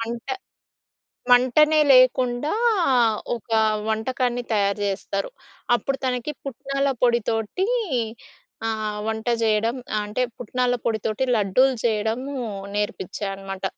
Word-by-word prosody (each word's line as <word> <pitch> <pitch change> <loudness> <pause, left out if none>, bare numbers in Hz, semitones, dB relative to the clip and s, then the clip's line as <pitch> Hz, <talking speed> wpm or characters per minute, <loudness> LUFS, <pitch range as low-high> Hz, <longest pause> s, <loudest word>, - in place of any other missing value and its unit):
మంట 230 +1 -5 1.1
మంటనే 280 +5 +5
లేకుండా 255 +2 +4 0.8
ఒకా 225 -1 -1 0.3
వంటకాన్ని 245 +2 -1
తయారు 200 -1 +1
చేస్తారు. 195 - -3 0.5
అప్పుడు 270 +4 -2
తనకి 250 +3 -1
పుట్నాల 275 +1 -2
పొడితోటీ, 235 - +1 1.0
ఆహ్, 215 -1 -2
వంట 220 +1 -3 0.2
చేయడం 225 +2 +2 0.2
ఆహ్, 210 - 0
అంటే, 215 +5 -1 0.2
పుట్నాల 250 +2 0
పొడితోటి 220 +2 -1
లడ్డూలు 225 +6 +3
చెయడమూ 230 +5 -1 0.4
నేర్పిచ్చా 205 -1 -3
అనమాట. 195 0 -8
230 Hz, 95 wpm, -23 LUFS, 215-255 Hz, 1.1 s, మంటనే